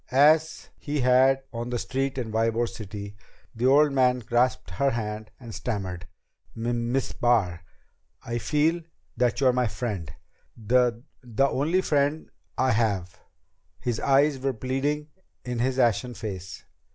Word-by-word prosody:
As 155 +4 +3
he 145 -1 -2
had 130 +2 +4
on 120 +1 -4
the 125 - -1
street 135 +3 -2
in 120 -4 -3
Ybor 115 +1 +1
City, 100 -2 -8 0.4
the 120 +3 0
old 145 +2 +5
man 130 -2 +3
grasped 120 +1 0
her 140 +1 +1
hand 110 -2 -4
and 115 -3 -9
stammered, 95 -7 -4 0.5
"M 120 +1 -1
Miss 135 0 0
Barr 100 -9 +1 0.6
I 120 0 -2
feel 160 +6 +1 0.3
that 120 0 +1
you're 130 -2 +4
my 125 -1 +1
friend 100 -6 -4 0.5
the 120 +1 +1 0.2
the 125 +2 +1
only 160 +8 +1
friend 145 -2 0 0.3
I 130 +1 +2
have 100 -6 0 0.3
" - - -44
His 120 -2 -2
eyes 140 +1 +3
were 135 0 -1
pleading 135 +5 -2 0.4
in 125 -1 -3
his 130 +2 0
ashen 120 0 +1
face. 95 -3 -7
125 Hz, 145 wpm, -26 LUFS, 110-135 Hz, 0.6 s, old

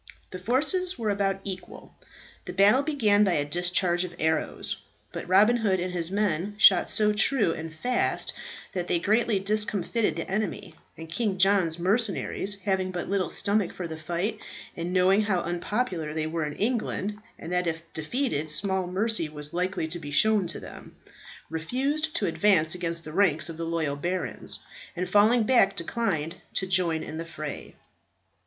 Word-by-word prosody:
The 185 - -6
forces 310 - 0
were 220 -3 -1
about 195 -1 0
equal. 185 -2 -8 0.5
The - - -6
battle 205 +7 +5
began 225 -9 +3
by 190 -3 +2
a 145 -2 +1
discharge 175 +2 +1
of 175 -1 -6
arrows; 160 -1 -1 0.3
but - - -6
Robin 210 +6 +5
Hood 200 -5 +1
and 180 +1 -3
his 170 -2 -1
men 200 -1 -1
shot 190 -4 +6
so 210 -1 +2
true 215 -3 +2
and 160 0 -6
fast 245 +11 -1 0.4
that 180 -2 -3
they - - +2
greatly 215 +4 +2
discomfited 210 +2 0
the - - -4
enemy; 195 +1 -3 0.2
and 165 - -8
King 195 +3 -1
John's 185 -4 +3
mercenaries 200 +1 0
having 190 -1 0
but 180 -1 -4
little 195 -3 0
stomach 200 -3 +2
for 180 - -5
the 160 - -6
fight, 175 +7 -3 0.4
and 170 +1 -4
knowing 190 +2 +4
how 195 -4 0
unpopular 175 -2 -2
they 155 -1 -1
were 160 -1 -2
in 150 - -5
England, 215 -3 -2 0.2
and 165 +2 -6
that 180 -1 +1
if 165 -1 -2
defeated 160 - -2
small 190 +3 0
mercy 190 -2 +1
was 150 -1 -3
likely 180 -1 -1
to 170 +2 -5
be 145 -3 -8
shown 205 +5 +3
to 170 - -5
them, - - -11 0.5
refused 275 - -2
to - - +1
advance 185 -7 +3
against 170 -2 -2
the 155 - -8
ranks 165 -4 +2
of 165 - -7
the 165 - -3
loyal 160 -4 -1
barons, 175 +5 -3 0.3
and 180 +1 -2
falling 220 +3 +4
back 210 -4 +4
declined 170 -4 -2 0.2
to 190 - 0
join 180 -4 +1
in 155 - -7
the 165 - -4
fray. 155 -3 -7
185 Hz, 170 wpm, -27 LUFS, 165-210 Hz, 0.5 s, shot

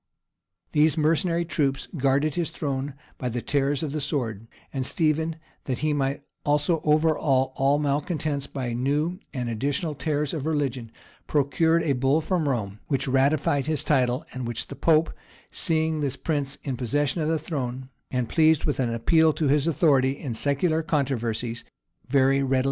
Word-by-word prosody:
[] - - -53
These 155 +1 +3
mercenary 165 +2 +2
troops 140 -5 -1
guarded 140 +1 +2
his 170 -1 -1
throne 140 -1 -3 0.2
by 125 - -2
the 120 +1 -2
terrors 140 +3 0
of 150 - -2
the 155 +1 -3
sword; 115 -7 -2 0.3
and 135 -2 -1
Stephen, 160 +3 0 0.3
that 130 -3 -2
he 155 - +2
might 140 0 -1 0.2
also 150 +2 +2
overawe 150 -4 +2
all 135 +2 +3
malecontents 145 0 -1
by 125 -4 -4
new 145 +9 0
and 125 -3 -3
additional 140 +7 -1
terrors 150 +1 -1
of 155 -2 -3
religion, 135 -7 -1 0.4
procured 155 +4 +2
a 145 - +2
bull 135 +4 +2
from 160 -2 0
Rome, 105 -5 -2
which 140 -1 -1
ratified 140 +1 +2
his 155 -2 0
title, 130 0 +1
and 130 -2 -4
which 120 - -4
the - - -7
pope, 160 0 +3 0.4
seeing 160 -2 0
this 140 -2 -1
prince 145 -3 -2
in 135 -4 -3
possession 140 +5 0
of 155 - 0
the 160 - +2
throne, 130 -5 -4 0.2
and 125 -2 -1
pleased 160 +3 +3
with 145 - -1
an 120 -3 +1
appeal 160 +7 +3
to 150 -2 0
his 145 +2 +3
authority 140 -4 +3
in 130 -5 -5
secular 145 +7 +1
controversies, 120 -6 -1 0.5
very 135 0 +4
readily 135 - 0
granted 135 - +2
him. - - +3
140 Hz, 170 wpm, -25 LUFS, 130-155 Hz, 0.5 s, very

